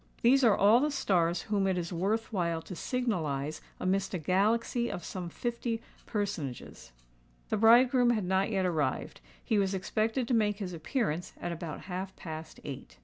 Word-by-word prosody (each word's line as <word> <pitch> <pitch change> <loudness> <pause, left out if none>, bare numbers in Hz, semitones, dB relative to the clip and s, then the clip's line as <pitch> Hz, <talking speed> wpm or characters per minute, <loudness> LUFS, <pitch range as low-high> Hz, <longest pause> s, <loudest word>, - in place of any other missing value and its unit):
These 265 +3 +5
are 225 -4 +5
all 210 +4 +6
the 295 +3 +1
stars 180 - +1
whom 200 -2 0
it 190 -1 +1
is 170 0 -3
worth 210 +7 -1
while 170 -4 0
to 185 - -8
signalise 160 - -2 0.2
amidst 190 +1 0
a - - +1
galaxy 220 - +1
of 175 - -5
some 180 -2 -5
fifty 235 +3 -3 0.3
personages. 175 - -4 0.6
The - - +1
bridegroom 240 +3 +6
had 215 -5 +1
not 190 +2 +1
yet 195 -4 0
arrived: 150 - -1 0.2
he 215 - +2
was 195 -1 +1
expected 220 +6 -1
to 250 - 0
make 210 -3 +2
his 190 -4 -5
appearance 175 - -2
at 175 - -3
about 170 -2 -5
half 185 +1 -5
past 160 -1 -8
eight. 135 -2 -8
195 Hz, 170 wpm, -30 LUFS, 170-225 Hz, 0.6 s, all